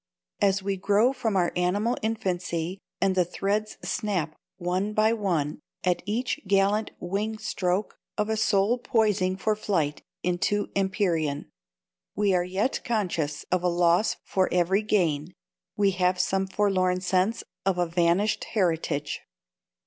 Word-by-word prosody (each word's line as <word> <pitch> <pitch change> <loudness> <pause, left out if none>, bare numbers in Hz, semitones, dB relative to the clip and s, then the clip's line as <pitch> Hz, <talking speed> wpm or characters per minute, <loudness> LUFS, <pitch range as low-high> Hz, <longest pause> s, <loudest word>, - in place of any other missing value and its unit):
As 195 -1 +3
we 195 0 -1
grow 205 +7 +3
from 225 -6 -1
our 175 -2 +2
animal 205 +7 +1
infancy, 185 -5 -2 0.2
and 195 -1 +2
the 185 -1 +3
threads 200 +4 -2
snap 180 -7 -1 0.2
one 185 +4 -1
by 215 +1 +3
one 170 -10 -1 0.2
at 180 -1 +1
each 235 +5 -1
gallant 200 +2 +2
wing 205 +5 -2
stroke 185 -1 -2 0.2
of 210 -1 +1
a 220 - 0
soul 215 +2 +2
poising 210 -6 +1
for 215 +2 +1
flight 165 -9 -1 0.2
into 180 +3 0
Empyrean, 180 -7 0 0.6
we 205 -1 +2
are 180 -1 +3
yet 190 +8 -1
conscious 175 -10 -1
of 180 -1 +2
a 180 - +1
loss 175 +3 +3
for 190 -1 +1
every 180 +3 +2
gain, 175 -7 0 0.4
we 200 -1 +4
have 180 -1 +1
some 190 +1 +1
forlorn 185 -2 +1
sense 185 +4 +1 0.2
of 195 -2 +1
a 175 - +2
vanished 175 +5 +1
heritage. 165 -6 0
190 Hz, 140 wpm, -26 LUFS, 180-210 Hz, 0.6 s, we